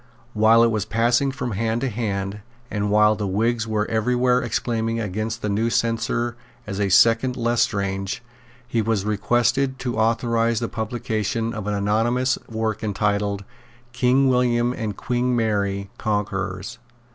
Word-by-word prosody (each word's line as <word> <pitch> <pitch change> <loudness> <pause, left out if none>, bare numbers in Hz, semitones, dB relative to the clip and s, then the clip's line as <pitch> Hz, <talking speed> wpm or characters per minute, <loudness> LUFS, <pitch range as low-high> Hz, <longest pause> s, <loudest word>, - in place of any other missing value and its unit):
While 110 +2 +5
it 115 - +3
was 110 -3 0
passing 120 +5 +2
from 125 -2 -4
hand 115 +3 -1
to 135 - 0
hand, 100 -4 -3 0.3
and 105 -1 -1
while 105 +1 +4
the 105 -1 -3
Whigs 115 +4 0
were 105 -1 0
every 110 +3 0
where 125 0 +3
exclaiming 115 -1 -1
against 110 +2 -3
the - - 0
new 110 +3 +1
censor 115 +1 0 0.3
as 100 -1 -5
a 100 -1 +1
second 115 +6 +4
Lestrange, 100 -4 -1 0.4
he 115 -1 0
was 110 -2 0
requested 120 +5 +1
to 120 -3 -3
authorise 115 0 +1
the 115 - -2
publication 110 0 -2
of 105 -2 -5
an 105 - 0
anonymous 115 +6 +1
work 110 -1 -2
entitled 100 -1 0 0.5
King 125 +2 +3
William 125 -1 +2
and 110 -5 -4
Queen 125 0 0
Mary 100 -3 -1
Conquerors. 100 -3 -2
115 Hz, 145 wpm, -23 LUFS, 105-120 Hz, 0.5 s, While